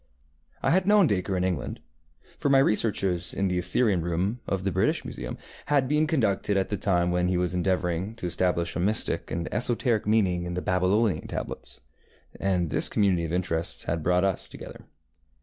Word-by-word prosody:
I 135 - +2
had 185 +3 +2
known 205 -2 +6
Dacre 95 - 0
in 90 - 0
England, 90 -8 -2 0.6
for - - 0
my 135 - +5
researches 100 -8 +1
in 95 -1 0
the 90 0 0
Assyrian 90 +1 +2
Room 90 +8 -1
of 95 -1 -2
the 95 - 0
British 95 +2 0
Museum - - -6 0.3
had 140 -3 +2
been 150 +3 +2
conducted 105 -9 +1
at 95 - 0
the 105 - -1
time 90 -3 +1
when 90 0 +1
he 90 0 +1
was 90 0 0
endeavouring 90 +2 -1
to 105 - -7
establish 85 -1 -1
a - - -2
mystic 105 +5 +1
and 85 0 -3
esoteric 120 -2 +1
meaning 95 -5 +2
in 90 0 -4
the 90 - -2
Babylonian 90 +4 +1
tablets, - - -6 0.6
and 90 -4 0
this - - +2
community 95 -5 +1
of 80 - -5
interests 85 -2 -1
had 80 +1 -2
brought 90 +3 +2
us 95 -2 -1
together. - - -11
95 Hz, 185 wpm, -26 LUFS, 90-110 Hz, 0.6 s, known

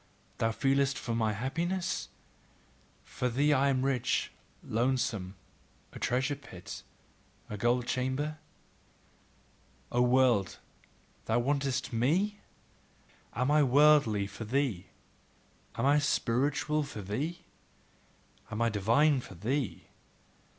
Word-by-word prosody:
Thou 115 - +2
feelest 135 +3 +1
for 115 - -4
my 110 -2 +1
happiness? 170 - -2 0.9
For 125 - -3
thee 145 +5 +2
am 135 -1 +2
I - - +2
rich, 125 -3 0 0.3
lonesome, 115 -5 -1 0.6
a - - -8
treasure 130 +3 0
pit, 95 -10 -10 0.7
a - - -3
gold 120 +3 +1
chamber? 130 +5 -2 1.5
O 120 - +2
world, 125 -5 +3 0.7
thou 110 - +1
wantest 135 0 -1
ME? 180 - +1 1.0
Am 125 +4 +1
I 150 0 +5
worldly 140 -6 +4
for 105 - -8
thee? 110 -6 -1 0.9
Am 115 - -1
I 145 +2 +5
spiritual 145 +2 +1
for 125 -8 -6
thee? 150 - -3 1.1
Am 105 - -4
I 115 0 +3
divine 115 +8 +3
for 95 - -11
thee? 125 - -2
130 Hz, 110 wpm, -30 LUFS, 115-145 Hz, 1.5 s, I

